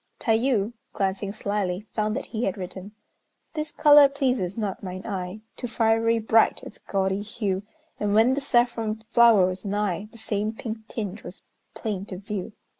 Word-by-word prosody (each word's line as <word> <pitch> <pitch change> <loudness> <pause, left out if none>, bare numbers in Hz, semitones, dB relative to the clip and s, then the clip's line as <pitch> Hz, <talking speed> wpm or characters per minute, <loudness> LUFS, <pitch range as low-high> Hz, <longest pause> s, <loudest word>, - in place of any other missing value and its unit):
Tayû, 225 -1 +1 0.2
glancing 195 0 -1
slyly, 200 -2 -2
found 215 0 0
that - - -3
he 230 +1 -3
had 195 - -1
written: 190 +2 -7 0.6
This 305 -1 -3
color 290 -2 +7
pleases 250 - -1
not 205 -4 -3
mine 185 0 -6
eye, 195 0 -4
Too 245 - -5
fiery 225 0 +2
bright 225 0 +3
its - - -11
gaudy 195 0 -1
hue, 205 -3 -2 0.4
And 205 0 +1
when 225 +4 +5
the 285 - -1
saffron 235 -4 +1
flower 230 -5 +7
was 185 +1 -3
nigh, 205 -1 -2
The 230 - -14
same 215 -1 -2
pink 220 -1 -6
tinge 210 -3 -5
was 180 - -10 0.3
plain 200 -3 -3
to 185 - -6
view. 205 0 -5
215 Hz, 165 wpm, -25 LUFS, 195-230 Hz, 0.6 s, color